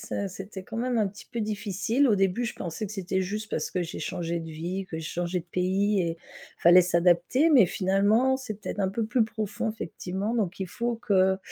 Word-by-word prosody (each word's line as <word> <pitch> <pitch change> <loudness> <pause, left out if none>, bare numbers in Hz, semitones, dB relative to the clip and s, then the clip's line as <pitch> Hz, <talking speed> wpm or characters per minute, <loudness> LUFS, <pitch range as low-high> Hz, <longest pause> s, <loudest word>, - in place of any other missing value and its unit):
ça 200 - -3
c'était 190 0 -8
quand 225 - -7
même 245 0 0
un 210 - +3
petit 205 +2 -9
peu 235 - -3
difficile. 215 +5 0
Au 210 - +4
début, 195 +5 +1
je 235 - -3
pensais 175 +5 -5
que 200 - -6
c'était 190 -1 -1
juste, 210 +3 -4
parce - - -2
que 180 - -1
j'ai 170 - -4
changé 170 0 -2
de 165 - -7
vie, 175 +5 -4
que 160 - -4
j'ai 160 - -6
changé 175 +1 -2
de 170 - -8
pays 190 +3 +1
et 165 0 -2 0.4
fallait 175 +2 +7
s'adapter, 175 - +3
mais 260 -10 +7
finalement, 205 +9 +2
c'est 250 -5 -6
peut-être 200 - -4
un 190 - +2
peu 215 +3 -2
plus 225 +1 +2
profond 220 -1 -3
effectivement, 200 +1 -4
donc 200 -5 -1
il 190 - -2
faut 235 +5 -2
que 190 -5 +2
195 Hz, 220 wpm, -27 LUFS, 180-220 Hz, 0.4 s, fallait